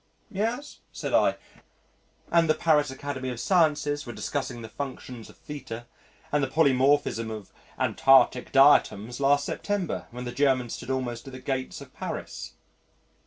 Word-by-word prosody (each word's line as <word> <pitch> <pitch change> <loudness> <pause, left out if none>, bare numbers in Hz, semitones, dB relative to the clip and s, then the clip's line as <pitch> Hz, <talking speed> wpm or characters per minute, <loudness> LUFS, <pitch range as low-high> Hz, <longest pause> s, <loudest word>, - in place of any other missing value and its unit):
"Yes," 230 +8 -3
said - - -5
I, - - +4 1.0
"and 165 -1 +4
the 155 - +4
Paris 150 -3 +3
Academy 130 -1 -5
of 125 -2 -5
Sciences 150 -5 +2
were 120 - -7
discussing 130 -4 -4
the - - -6
functions 125 -2 -7
of - - -16
θ 130 -6 -7 0.5
and 150 -1 +2
the - - +1
Polymorphism 135 -5 +2
of 110 -3 -7 0.3
Antarctic 130 -2 +4
diatoms 130 -4 +4
last 140 +1 +3
September 205 -4 -3
when 125 +1 -7
the 120 - -4
Germans 130 -2 +1
stood - - -7
almost 130 -1 -3
at 135 - -9
the 130 - -7
gates 130 0 -3
of - - -12
Paris." - - -6
135 Hz, 150 wpm, -27 LUFS, 125-145 Hz, 1.0 s, I